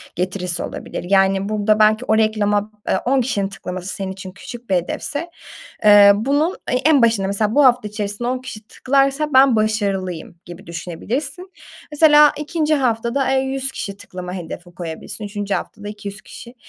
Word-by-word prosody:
getirisi 180 -1 -2
olabilir. - - -6
Yani, 195 0 +2
burada 215 0 +1
belki 215 +3 +3
o 220 - +2
reklama, 210 -1 +1 0.2
eee, - - +2
10 265 +1 +2
kişinin 210 -5 -1
tıklaması 185 -2 -7
senin 195 -1 -4
için 190 0 -9
küçük 235 +4 -11
bir 190 - +2
hedefse, 285 - -3 0.6
eee, 205 -1 +8
bunun 285 - 0 0.2
e - - +2
en 280 +1 +3
başında 225 -4 +2
mesela 210 +2 -1
bu 290 - +5
hafta 245 -4 +3
içerisinde 210 +2 -4
10 255 +1 -1
kişi 255 -4 -9
tıklarsa, 275 +3 +1
"Ben 260 -2 +6
başarılıyım." 200 -6 -2
gibi 175 +2 -12
düşünebilirsin. 245 - -5 0.4
Mesela 295 -1 +6
2'nci 310 0 0
haftada, 255 0 0
eee, 265 - +3
100 270 0 -3
kişi 200 -6 -6
tıklama 180 -2 -8
hedefi 175 0 -8
koyabilirsin. 175 +4 -7
3'üncü 205 -1 -3
haftada 205 -1 -6
200 205 0 -8
kişi 235 +2 -12
215 Hz, 160 wpm, -20 LUFS, 195-265 Hz, 0.6 s, eee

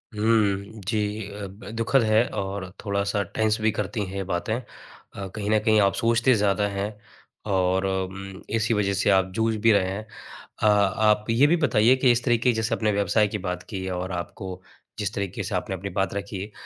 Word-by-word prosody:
हुँ, 105 -1 +1
जी। 105 -1 -1
अ, 100 0 -6
ब 100 +1 -11
दुखद 115 +4 +2
है 110 +1 +4 0.2
और 95 -1 -5 0.2
थोड़ा-सा 100 0 0
टेंस 110 -1 +2
भी 110 0 +3
करती 110 0 -3
हैं 95 +1 -8
ये 95 - -2
बातें। 90 +3 -2
अ, 100 -4 -11
कहीं 105 -1 -3
न 110 - +4
कहीं 110 -1 +4
आप 100 0 +3
सोचते 115 +2 +3
ज़्यादा 105 -1 +2
हैं 100 0 -2 0.6
और 95 0 +2
अम, 95 0 -4
इसी 110 +1 +1
वजह 100 -2 +1
से 100 +2 +1
आप 95 -1 +3
जूझ 110 0 +1
भी 115 +1 +5
रहे 95 -3 +3
हैं। 100 +3 -4 0.6
अ, - - +5
आप 105 +1 +3
ये 120 +6 +5
भी 170 +3 +3
बताइए 115 +5 +4
कि 130 - +7
इस 120 0 +1
तरीके 120 0 +3
जैसे 110 +1 -1
आप - - -9
अपने 110 -1 +2
व्यवसाय 100 +1 +2
की 105 - -3
बात 90 - -4
की 95 -4 -4
और 90 +1 -4
आपको 90 +1 -6 0.4
जिस 105 0 -2
तरीके 100 -2 -3
से - - -3
आपने 95 - -2
अपनी 95 +2 -5
बात 95 - 0
रखी, 100 0 -5
105 Hz, 200 wpm, -25 LUFS, 95-110 Hz, 0.6 s, कि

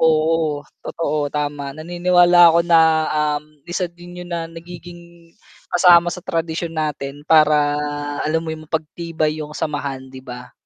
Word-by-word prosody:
Oo, 160 -2 +1 0.2
totoo, 150 -3 -2
tama. 145 -1 -4
Naniniwala 175 +1 +4
ako 170 +1 +4
na, 170 -1 +5 0.6
um, 145 - -7 0.2
isa 180 +2 -1
din 175 +1 -13
'yun 175 - -11
na 165 -1 -3
nagiging 170 0 -13 0.4
kasama 175 -1 +6
sa 180 - -7
tradisyon 165 0 -3
natin, 145 -2 -4
para 150 -2 +4 0.5
alam 160 +2 0
mo - - -6
yun, 155 0 -9
mapagtibay 160 0 -3
yung 150 0 -7
samahan, 140 -3 -4
'di 130 0 -11
ba? 125 -1 -10
160 Hz, 140 wpm, -20 LUFS, 150-170 Hz, 0.6 s, kasama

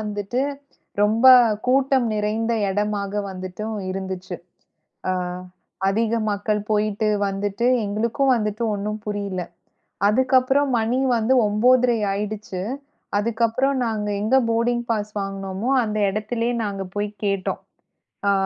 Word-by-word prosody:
வந்துட்டு 210 +3 -3 0.6
ரொம்ப 220 +4 +3 0.4
கூட்டம் 265 -1 +3
நிறைந்த 215 +2 0 0.2
எடமாக 205 0 -1
வந்துட்டு 185 +2 -6 0.3
இருந்துச்சு. 190 -1 -5 0.7
அ - - +2 0.8
அதிக 225 +3 +1
மக்கள் 210 +1 -1
போயிட்டு 210 0 +1 0.2
வந்துட்டு 200 +4 -2 0.2
எங்களுக்கும் 235 +7 +1
வந்துட்டு 215 0 -2
ஒண்ணும் 210 +1 -3
புரில. 200 -3 -3 0.7
அதுக்கப்புறம் 260 +4 +3
மணி 230 +3 0 0.2
வந்து 230 +3 +2
9.30 240 +3 +3
ஆயிடுச்சு. 205 -2 -4 0.6
அதுக்கப்புறம் 230 +5 +1
நாங்க 215 -2 -2
எங்க 220 +6 +2
போடிங் 240 +1 +1
பாஸ் 210 -1 -1
வாங்குனோமோ 195 +3 -3
அந்த 215 0 -2
எடத்திலே 220 +4 -1
நாங்க 200 -2 -3
போய்க் 205 0 -3
கேட்டோம். 195 -2 -1 0.7
அ - - +5
210 Hz, 105 wpm, -22 LUFS, 205-235 Hz, 0.8 s, அ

